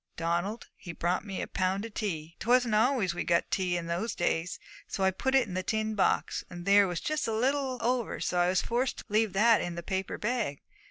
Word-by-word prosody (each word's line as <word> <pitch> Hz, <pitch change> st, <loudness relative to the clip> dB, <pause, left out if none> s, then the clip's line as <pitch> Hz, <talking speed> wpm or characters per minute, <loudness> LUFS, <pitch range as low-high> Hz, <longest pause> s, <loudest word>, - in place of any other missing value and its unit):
Donald, 175 Hz, +7 st, -1 dB
he 170 Hz, -, -8 dB
brought 175 Hz, +2 st, -1 dB
me 195 Hz, -3 st, -4 dB
a -, -, -5 dB
pound 190 Hz, +3 st, -1 dB
of 225 Hz, -, -9 dB
tea. 170 Hz, -7 st, -4 dB
'Twasn't 245 Hz, -1 st, +3 dB
always 220 Hz, -4 st, +2 dB
we 175 Hz, -, -3 dB
got 170 Hz, -, +1 dB
tea 180 Hz, -2 st, +1 dB
in 170 Hz, -, -4 dB
those 170 Hz, +7 st, -2 dB
days, 175 Hz, 0 st, -1 dB, 0.3 s
so 195 Hz, -, -3 dB
I 190 Hz, -, +4 dB
put 265 Hz, +8 st, -1 dB
it 260 Hz, -4 st, +4 dB
in 185 Hz, -, -7 dB
the 185 Hz, -, -1 dB
tin 220 Hz, +3 st, -1 dB
box; 200 Hz, -, +1 dB
and 175 Hz, 0 st, -8 dB
there 200 Hz, 0 st, +6 dB
was 175 Hz, -2 st, -2 dB
just 305 Hz, -4 st, -1 dB
a -, -, -1 dB
little 260 Hz, +3 st, 0 dB
over, 245 Hz, -1 st, 0 dB
so 180 Hz, -, 0 dB
I 175 Hz, -, +4 dB
was 185 Hz, +1 st, +2 dB
forced 245 Hz, +2 st, -1 dB
to -, -, -9 dB
leave 215 Hz, -1 st, +2 dB
that 220 Hz, +3 st, +5 dB
in 175 Hz, -1 st, -4 dB
the 170 Hz, -, -5 dB
paper 190 Hz, +2 st, -3 dB
bag. 210 Hz, -, -2 dB
200 Hz, 230 wpm, -29 LUFS, 175-230 Hz, 0.3 s, there